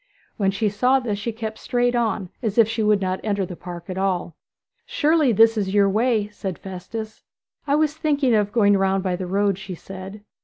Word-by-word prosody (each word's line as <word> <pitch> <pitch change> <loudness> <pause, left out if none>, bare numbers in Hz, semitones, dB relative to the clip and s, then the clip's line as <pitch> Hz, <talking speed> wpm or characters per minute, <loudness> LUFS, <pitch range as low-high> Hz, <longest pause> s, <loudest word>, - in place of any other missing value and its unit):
When 195 -2 +2
she 205 +3 0
saw 250 +6 +2
this 215 -5 -3
she 230 +3 -3
kept 220 -1 -6
straight 245 0 0
on, 220 -6 -1
as 220 -3 -2
if 230 -2 +6
she 225 0 -2
would 210 -1 +3
not 185 0 -1
enter 200 -3 0
the 180 - -8
park 175 0 -9
at 185 0 -4
all. 185 -4 -1 0.5
'Surely 300 -3 +2
this 225 +1 +5
is 195 -1 -2
your 200 -1 +5
way?' 215 +1 +1
said 195 -4 -5
Festus. 205 +4 -7 0.5
'I 285 - +3
was 305 -1 +2
thinking 290 -5 +1
of 205 -2 +2
going 205 -3 +4
round 195 0 +1
by 185 -2 0
the 185 0 -5
road,' 200 0 +1
she 195 -2 -7
said. 195 +3 -9
205 Hz, 205 wpm, -22 LUFS, 190-230 Hz, 0.5 s, if